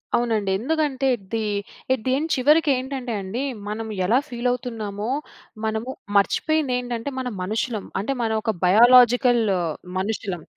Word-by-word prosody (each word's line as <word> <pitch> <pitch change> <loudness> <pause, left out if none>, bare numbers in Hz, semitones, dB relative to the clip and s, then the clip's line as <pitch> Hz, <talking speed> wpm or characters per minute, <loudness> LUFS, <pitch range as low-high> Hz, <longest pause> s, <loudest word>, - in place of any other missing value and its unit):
అవునండి. 220 -4 0
ఎందుకంటే 280 0 0
ఇది, 220 +1 -5 0.5
ఇది 255 0 -1 0.2
చివరికి 300 +4 +4
ఏంటంటే 260 -2 -4
అండి 195 +7 -4 0.3
మనం 220 +2 -4 0.2
ఎలా 230 +7 +4
ఫీల్ 240 0 -2
అవుతున్నామో 220 -4 -4 0.6
మనము 220 +3 -2 0.3
మర్చిపోయింది 285 +7 +1
ఏంటంటే 245 +2 -4
మనం 250 -2 -3
మనుషులం. 215 +2 -2 0.2
అంటే 245 +7 -1
మనం 220 -1 0
ఒక 220 - 0
బయాలాజికల్ 245 +4 +6 0.6
మనుషులం. 195 -4 -3
240 Hz, 120 wpm, -23 LUFS, 215-255 Hz, 0.6 s, బయాలాజికల్